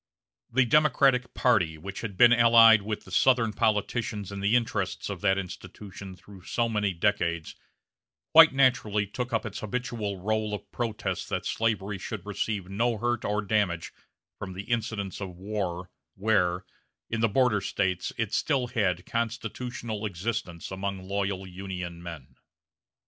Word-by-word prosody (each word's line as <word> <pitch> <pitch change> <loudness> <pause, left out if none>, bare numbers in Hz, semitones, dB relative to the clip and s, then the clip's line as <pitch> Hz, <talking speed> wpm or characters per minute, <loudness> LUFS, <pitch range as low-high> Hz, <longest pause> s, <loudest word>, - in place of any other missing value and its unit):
The 125 +1 +4
Democratic 135 -2 +3
party, 90 -11 +2
which 95 +5 -7
had 100 -5 -6
been 120 +3 +8
allied 115 -2 +7
with 105 +1 -4
the - - -13
Southern 125 -4 +3
politicians 105 -1 -1
in 100 - -5
the 100 +4 +2
interests 120 -1 -1
of - - -6
that 95 -2 +3
institution 95 0 -8
through 95 +1 -15
so 120 -1 0
many 105 -3 0
decades, 85 -3 -1 0.8
quite 165 0 +9
naturally 125 -6 +2
took 120 +5 -5
up 115 -1 0
its 105 -2 -5
habitual 110 -3 -3
rôle 110 +2 -1
of - - -11
protest 115 -3 -3
that - - -2
slavery 105 -3 -1
should 100 0 -6
receive 105 -2 -3
no 115 +4 0
hurt 120 +1 -1
or 105 +1 -1
damage 100 -5 0 0.5
from 95 -2 -6
the 95 +2 -6
incidents 110 -4 -3
of 95 -2 -6
war, 95 -2 -4 0.2
where, 95 -3 +1 0.4
in 115 0 -2
the 115 - +3
border 115 -2 +2
States, 95 -3 -1
it 110 -2 -2
still 130 -5 +1
had 95 -7 0
constitutional 115 -1 -3
existence 90 -3 -4
among 95 0 -4
loyal 100 -1 -2
Union 90 -2 -6
men. 80 -6 -10
105 Hz, 150 wpm, -27 LUFS, 95-115 Hz, 0.8 s, quite